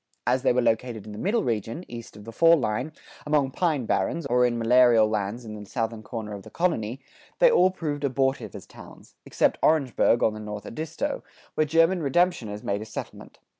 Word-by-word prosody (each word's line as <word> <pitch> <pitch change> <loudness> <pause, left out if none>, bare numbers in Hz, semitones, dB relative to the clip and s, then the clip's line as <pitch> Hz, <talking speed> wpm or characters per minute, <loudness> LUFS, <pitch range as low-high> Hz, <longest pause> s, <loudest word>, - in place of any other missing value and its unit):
As 125 +1 +2
they - - +3
were 125 0 +1
located 115 -2 -1
in 105 - -9
the 105 - -8
middle 220 +4 0
region, 115 - -3
east 115 -3 -9
of 105 - -11
the 115 - -8
fall 165 +7 +5
line, 125 +3 -2 0.3
among 145 -3 +1
pine 155 -6 0
barrens, 125 - -1
or 125 -2 +3
in 120 -1 -2
malarial 115 -1 +5
lands 105 +2 -3
in 110 - -7
the 105 -1 -8
southern 115 -2 -3
corner 110 -2 -6
of 100 - -7
the - - -13
colony, 135 -9 -1 0.4
they - - +6
all 185 - +5
proved 150 -6 -4
abortive 135 0 -1
as - - -9
towns, - - -15
except - - +1
Orangeburg[96:5] 135 -6 +3
on 110 - +3
the 110 - -8
North 105 -1 -7
Edisto, 155 +7 -4 0.3
where 155 - +1
German 165 +4 +3
redemptioners 140 - 0
made 100 +1 -2
a - - -6
settlement. - - -8
125 Hz, 200 wpm, -25 LUFS, 110-155 Hz, 0.4 s, they